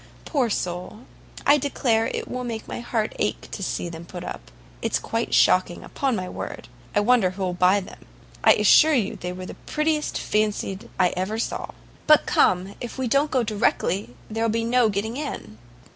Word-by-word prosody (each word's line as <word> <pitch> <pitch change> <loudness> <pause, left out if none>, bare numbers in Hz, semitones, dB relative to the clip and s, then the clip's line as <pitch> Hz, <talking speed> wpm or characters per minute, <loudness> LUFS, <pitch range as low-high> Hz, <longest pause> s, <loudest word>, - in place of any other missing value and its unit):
Poor 265 -6 +1
soul! 180 +2 -3 0.4
I 290 +1 +6
declare 235 -5 +1
it - - -4
will 250 0 -4
make 230 -2 -5
my - - -5
heart 230 -2 -2
ache 210 - -1
to - - -6
see 180 - -2
them 165 -1 -8
put 175 +1 -8
up. - - -7 0.3
It's - - +1
quite - - -2
shocking, 185 -1 +3
upon 270 -3 -1
my 185 -3 -3
word. 120 - -7 0.3
I 205 - +4
wonder 230 -3 +4
who'll 185 -1 -3
buy 185 +3 +3
them. 185 - -13 0.4
I - - +8
assure 315 -1 +6
you 215 -6 0
they 180 - -5
were 185 0 -7
the - - -7 0.2
prettiest 305 0 0
fancied 210 -2 -1
I 180 -1 +5
ever 190 +5 -3
saw. 230 - -3 0.4
But 305 -1 +6
come, 185 +2 +2
if 240 - -6
we 260 -1 -1
don't 280 +5 +2
go 255 -3 +1
directly, 205 - 0
there 225 +1 -2
will 230 - +2
be 230 +1 0
no 240 -1 +3
getting 215 +4 -2
in." 190 - -6
215 Hz, 190 wpm, -24 LUFS, 185-250 Hz, 0.4 s, I